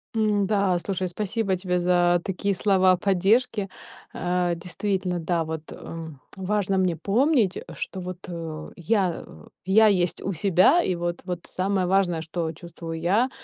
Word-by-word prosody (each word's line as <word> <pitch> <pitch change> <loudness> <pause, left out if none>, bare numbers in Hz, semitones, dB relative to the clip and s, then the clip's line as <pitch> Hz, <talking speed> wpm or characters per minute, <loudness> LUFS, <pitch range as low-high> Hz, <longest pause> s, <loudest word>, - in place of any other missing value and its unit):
М, 210 -2 +2
да, 200 -3 +2
слушай, 185 +1 -2
спасибо 205 +1 -1
тебе 180 -1 -1
за 175 0 +3
такие 195 +1 -1
слова 190 -1 +4
поддержки. 205 +3 +2 0.5
Э, 180 0 0
действительно, 180 +1 -2
да, 165 0 0
вот, 160 -1 -5
э, 165 0 -8 0.3
важно 195 0 0
мне 185 -3 +2
помнить, 220 - +2 0.2
что 190 - -5
вот, 180 0 -6
э, 165 -3 -6
я, 180 0 0
э, 75 - -15 0.2
я 215 +4 +6
есть 180 -4 +1
у 195 - -2
себя, 190 - +4
и 185 - 0
вот 175 0 -3
вот 180 -2 -3
самое 185 -1 0
важное, 180 -4 +2
что 165 0 -3
чувствую 165 0 -8
я, 205 +10 +2
185 Hz, 150 wpm, -25 LUFS, 175-200 Hz, 0.5 s, я